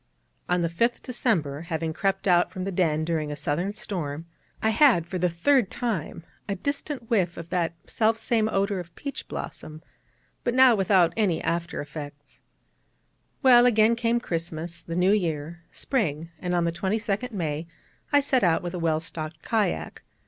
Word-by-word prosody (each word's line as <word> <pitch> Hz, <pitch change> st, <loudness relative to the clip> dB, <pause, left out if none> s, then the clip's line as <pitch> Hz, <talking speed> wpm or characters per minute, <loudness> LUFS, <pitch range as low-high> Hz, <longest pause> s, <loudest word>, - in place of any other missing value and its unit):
On 180 Hz, 0 st, +2 dB
the 170 Hz, -, +1 dB
5th 230 Hz, +9 st, 0 dB
December, 170 Hz, -, -1 dB
having 165 Hz, -1 st, -3 dB
crept 195 Hz, +3 st, -1 dB
out 175 Hz, -1 st, +4 dB
from 185 Hz, -, -5 dB
the 195 Hz, -, -2 dB
den 160 Hz, -4 st, +1 dB
during 155 Hz, -3 st, -1 dB
a -, -, -3 dB
southern 175 Hz, +8 st, -2 dB
storm, 165 Hz, -8 st, -4 dB, 0.3 s
I 220 Hz, -, +2 dB
had, 230 Hz, -, +5 dB
for 180 Hz, +1 st, -4 dB
the 180 Hz, 0 st, +2 dB
third 205 Hz, +6 st, +2 dB
time, 200 Hz, -9 st, -3 dB, 0.3 s
a 200 Hz, -, 0 dB
distant 280 Hz, +2 st, -4 dB
whiff 180 Hz, -6 st, +1 dB
of 170 Hz, 0 st, -8 dB
that 170 Hz, -2 st, 0 dB
self 225 Hz, 0 st, +1 dB
same 225 Hz, -1 st, +1 dB
odour 200 Hz, -1 st, 0 dB
of 170 Hz, -1 st, -9 dB
peach 280 Hz, -1 st, -6 dB
blossom: 155 Hz, +1 st, -7 dB, 0.6 s
but 240 Hz, -, 0 dB
now 260 Hz, -1 st, +7 dB
without 190 Hz, -4 st, +3 dB
any 200 Hz, -7 st, +1 dB
after 170 Hz, +1 st, -2 dB
effects. 145 Hz, -1 st, -9 dB, 1.0 s
Well, 245 Hz, -2 st, +7 dB
again 225 Hz, -1 st, +4 dB
came 235 Hz, 0 st, +1 dB
Christmas, 165 Hz, -3 st, -4 dB
the 165 Hz, -, -5 dB
New 180 Hz, +2 st, +3 dB
Year 170 Hz, -4 st, -2 dB
Spring: 165 Hz, -, -1 dB
and 180 Hz, 0 st, -1 dB
on 175 Hz, -, +2 dB
the 170 Hz, -, +1 dB
22nd 205 Hz, +6 st, -1 dB
May 160 Hz, -5 st, -3 dB, 0.4 s
I 290 Hz, -1 st, +5 dB
set 265 Hz, -4 st, +2 dB
out 170 Hz, -2 st, +3 dB
with 175 Hz, 0 st, -4 dB
a 180 Hz, -, -3 dB
well 160 Hz, -2 st, +1 dB
stocked 155 Hz, -1 st, -6 dB
kayak. 215 Hz, -6 st, -1 dB
180 Hz, 170 wpm, -26 LUFS, 165-220 Hz, 1.0 s, now